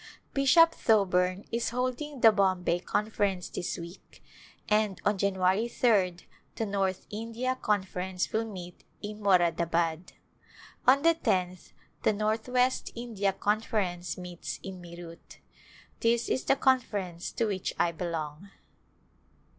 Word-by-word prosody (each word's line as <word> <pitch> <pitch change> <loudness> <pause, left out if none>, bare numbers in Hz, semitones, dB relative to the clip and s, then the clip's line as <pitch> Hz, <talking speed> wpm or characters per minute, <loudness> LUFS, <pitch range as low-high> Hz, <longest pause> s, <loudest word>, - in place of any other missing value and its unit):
Bishop 330 +5 +6
Thoburn 185 - +2
is 235 0 0
holding 255 +3 -3
the 225 - +8
Bombay 185 -4 +1
Conference 200 -1 -1
this 175 - -4
week 170 +1 -11 0.4
and 210 -2 +1
on 205 -1 +2
January 190 +2 +2
3d 195 -8 +1 0.3
the 225 - -1
North 195 -2 -1
India 230 +4 -2
Con 205 -2 +2
ference 185 0 -4
will 220 +1 +1
meet 180 -2 -9 0.2
in 210 +1 -6
Moradabad. 170 -3 +1 0.7
On 275 +3 +6
the 335 0 +6
tenth 185 - -1 0.3
the - - +3
Northwest 225 +5 0
India 225 -5 -1
Conference 195 -3 -1
meets 180 -1 -6
in 190 -2 -7
Meerut. 170 -1 -11 0.6
This 235 0 +1
is 260 - 0
the 270 - +4
Conference 205 -11 0
to 230 - 0
which 195 -4 -2
I 175 -1 +2
belong. 165 +1 -5
200 Hz, 125 wpm, -29 LUFS, 180-230 Hz, 0.7 s, the